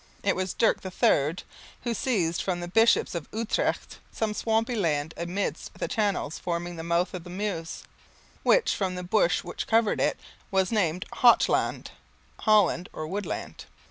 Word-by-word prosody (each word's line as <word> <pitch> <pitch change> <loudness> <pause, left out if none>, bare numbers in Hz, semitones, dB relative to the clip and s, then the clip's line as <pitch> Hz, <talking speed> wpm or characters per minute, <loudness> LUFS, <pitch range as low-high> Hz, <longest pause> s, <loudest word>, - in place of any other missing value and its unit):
It 200 - +2
was 185 0 -2
Dirk 230 - +2
III 165 -4 +2 0.5
who 235 - -1
seized 190 -9 0
from 180 -2 -2
the 175 - -5
bishops 225 +6 +3
of 170 -4 -5
Utrecht 225 0 -2
some 220 -1 -1
swampy 225 +2 0
land 160 -7 0
amidst 180 +4 -3
the - - -3
channels 205 - -1
forming 175 0 -3
the 165 - -6
mouth 170 +2 0
of 180 -2 -6
the 175 - -11
Meuse, 180 -4 -4 0.6
which, - - +3
from 190 -2 -2
the 180 - -5
bush 180 0 +2
which - - -5
covered 225 -2 +2
it, - - +1 0.3
was 190 -1 +1
named 185 -5 0
Holt 240 -1 +6
land - - -1 0.5
(Holland 200 -5 +3
or 155 - -5
Wood 195 +6 -4
land). - - -6
185 Hz, 165 wpm, -27 LUFS, 170-215 Hz, 0.6 s, Holt